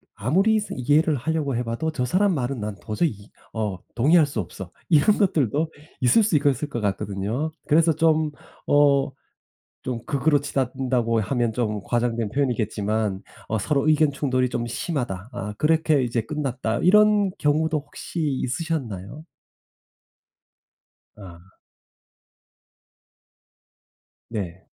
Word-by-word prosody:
'아무리 190 Hz, -, +2 dB
스 210 Hz, -, -6 dB
이해를 150 Hz, +5 st, +2 dB
하려고 145 Hz, 0 st, -1 dB
해 120 Hz, -, -1 dB
봐도 115 Hz, +7 st, -2 dB
저 125 Hz, -5 st, -2 dB
사람 190 Hz, +9 st, +2 dB
말은 130 Hz, -3 st, -2 dB
난 105 Hz, -1 st, -4 dB
도저히 110 Hz, +10 st, 0 dB
이 100 Hz, 0 st, -14 dB, 0.2 s
어 105 Hz, -4 st, -2 dB, 0.2 s
동의할 155 Hz, +7 st, +5 dB
수 140 Hz, -5 st, -4 dB
없어.' 90 Hz, -1 st, -7 dB, 0.2 s
이런 165 Hz, +5 st, +4 dB
것들도 155 Hz, -, +1 dB, 0.3 s
있을 130 Hz, -, +5 dB
수 200 Hz, -6 st, +1 dB
있것 140 Hz, -2 st, +1 dB
을 150 Hz, -, -2 dB
것 120 Hz, -5 st, -4 dB
같거든요. 100 Hz, +8 st, -2 dB, 0.2 s
그래서 160 Hz, +2 st, +4 dB
좀 160 Hz, -1 st, +2 dB, 0.4 s
어 140 Hz, -2 st, +4 dB, 0.7 s
좀 120 Hz, -3 st, -3 dB
극으로 145 Hz, +1 st, +2 dB
치닫는다고 125 Hz, -4 st, 0 dB
하면 120 Hz, +1 st, 0 dB
좀 105 Hz, -3 st, -2 dB
과장된 120 Hz, -2 st, -1 dB
표현이겠지만 110 Hz, -5 st, -1 dB, 0.3 s
'어 110 Hz, -, 0 dB
서로 140 Hz, +7 st, 0 dB
의견 155 Hz, -1 st, +4 dB
충돌이 130 Hz, -3 st, 0 dB
좀 120 Hz, -1 st, -3 dB
심하다. 120 Hz, -, -3 dB
아 105 Hz, -4 st, -5 dB
그렇게 155 Hz, -2 st, +3 dB
이제 120 Hz, -2 st, -1 dB
끝났다.' 130 Hz, -3 st, -2 dB
이런 210 Hz, +1 st, +4 dB
경우도 155 Hz, +1 st, +1 dB
혹시 150 Hz, +3 st, -7 dB, 0.2 s
있으셨나요? 130 Hz, -, -4 dB, 1.9 s
아. 90 Hz, -3 st, -13 dB, 2.8 s
네. 95 Hz, -5 st, -5 dB
130 Hz, 260 characters per minute, -24 LUFS, 110-155 Hz, 2.8 s, 동의할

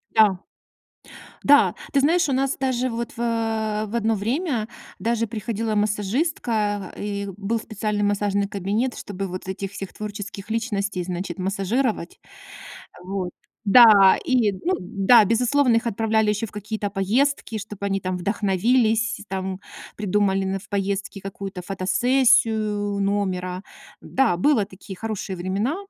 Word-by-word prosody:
Да. 205 Hz, -4 st, +5 dB, 1.0 s
Да, 285 Hz, 0 st, +5 dB, 0.2 s
ты 280 Hz, -, +4 dB
знаешь, 330 Hz, +4 st, +3 dB
у -, -, +1 dB
нас 270 Hz, +1 st, 0 dB
даже 255 Hz, -1 st, 0 dB
вот, 235 Hz, 0 st, -4 dB
в -, -, -12 dB
э, 220 Hz, -2 st, -1 dB
в 215 Hz, -, -6 dB
одно 225 Hz, -1 st, +1 dB
время 235 Hz, -, -1 dB, 0.3 s
даже 230 Hz, +3 st, 0 dB
приходила 220 Hz, 0 st, -3 dB
массажистка, 210 Hz, -, -1 dB
и 200 Hz, -1 st, -3 dB
был 210 Hz, +3 st, -1 dB
специальный 210 Hz, -1 st, -2 dB
массажный 205 Hz, 0 st, +1 dB
кабинет, 205 Hz, +6 st, -1 dB
чтобы 195 Hz, -1 st, -5 dB
вот 185 Hz, 0 st, -7 dB
этих 190 Hz, +1 st, -4 dB
всех 195 Hz, -1 st, -7 dB
творческих 205 Hz, -1 st, -7 dB
личностей, 205 Hz, -5 st, -2 dB
значит, 180 Hz, +2 st, -4 dB
массажировать. 195 Hz, +2 st, -1 dB, 0.8 s
Вот. 185 Hz, -1 st, -3 dB, 0.3 s
Да! 205 Hz, -3 st, +8 dB
И, 240 Hz, -6 st, +2 dB
ну, 340 Hz, -, -1 dB
да, 205 Hz, +4 st, +4 dB
безусловно, 245 Hz, +3 st, +3 dB
их 230 Hz, -, 0 dB
отправляли 220 Hz, 0 st, +1 dB
ещё 210 Hz, +2 st, 0 dB
в -, -, -13 dB
какие-то 210 Hz, 0 st, -4 dB
поездки, 225 Hz, +4 st, 0 dB
чтоб 210 Hz, -1 st, -9 dB
они 195 Hz, -1 st, 0 dB
там 185 Hz, 0 st, -2 dB
вдохновились, 220 Hz, +3 st, +1 dB
там 190 Hz, 0 st, -4 dB, 0.4 s
придумали 200 Hz, -1 st, +1 dB
на 190 Hz, 0 st, -1 dB
в 205 Hz, +2 st, -16 dB
поездке 200 Hz, 0 st, -2 dB
какую-то 195 Hz, -1 st, -6 dB
фотосессию 210 Hz, +1 st, +2 dB
номера. 190 Hz, -2 st, -1 dB, 0.4 s
Да, 265 Hz, -9 st, +1 dB
было 220 Hz, +1 st, +3 dB
такие 190 Hz, 0 st, -11 dB
хорошие 210 Hz, -2 st, -4 dB
времена. 195 Hz, -, -1 dB
210 Hz, 135 wpm, -23 LUFS, 195-230 Hz, 1.0 s, Да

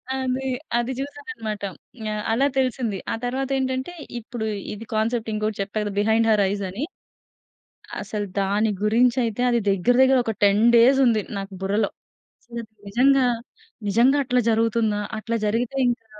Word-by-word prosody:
అది, 265 Hz, 0 st, -2 dB, 0.3 s
అది 240 Hz, +2 st, -1 dB
చూసాను 285 Hz, +3 st, -7 dB
అన్నమాట. 215 Hz, -, -5 dB, 0.5 s
యాహ్. 215 Hz, 0 st, -2 dB
అలా 260 Hz, +5 st, +3 dB
తెలిసింది. 250 Hz, -5 st, 0 dB
ఆ -, -, 0 dB
తరువాతేంటంటే, 260 Hz, +3 st, -1 dB, 0.3 s
ఇప్పుడు 235 Hz, 0 st, -5 dB, 0.3 s
ఇది 215 Hz, +2 st, -8 dB
కాన్సెప్ట్ 225 Hz, +1 st, 0 dB
ఇంకొకటి 215 Hz, 0 st, -2 dB
చెప్పా 200 Hz, +2 st, -4 dB
కదా! 205 Hz, -, -3 dB
'బిహైండ్ 220 Hz, +2 st, +3 dB
హర్ 210 Hz, -2 st, +4 dB
ఐస్' 200 Hz, 0 st, -2 dB
అని. 200 Hz, +9 st, -4 dB, 1.2 s
అసలు 205 Hz, 0 st, -3 dB, 0.2 s
దాని 205 Hz, +3 st, +1 dB
గురించి 235 Hz, +3 st, +3 dB
అయితే 225 Hz, +1 st, -3 dB
అది 240 Hz, -1 st, +2 dB
దగ్గర 195 Hz, +5 st, +3 dB
దగ్గర 265 Hz, 0 st, +5 dB
ఒక 225 Hz, -, -1 dB
10 205 Hz, +2 st, +4 dB
డేస్ 250 Hz, +4 st, +6 dB
ఉంది 225 Hz, -3 st, +3 dB, 0.2 s
నాకు 195 Hz, 0 st, -7 dB
బుర్రలో. 200 Hz, +2 st, +1 dB, 1.0 s
నిజంగా 265 Hz, +5 st, +4 dB, 0.6 s
నిజంగా 240 Hz, +8 st, +4 dB
అట్లా 250 Hz, -1 st, +2 dB
జరుగుతుందా? 225 Hz, -1 st, +1 dB, 0.2 s
అట్లా 230 Hz, +2 st, -2 dB
జరిగితే 230 Hz, +5 st, -1 dB
ఇంకా 235 Hz, -2 st, -2 dB
230 Hz, 145 wpm, -23 LUFS, 210-255 Hz, 1.2 s, డేస్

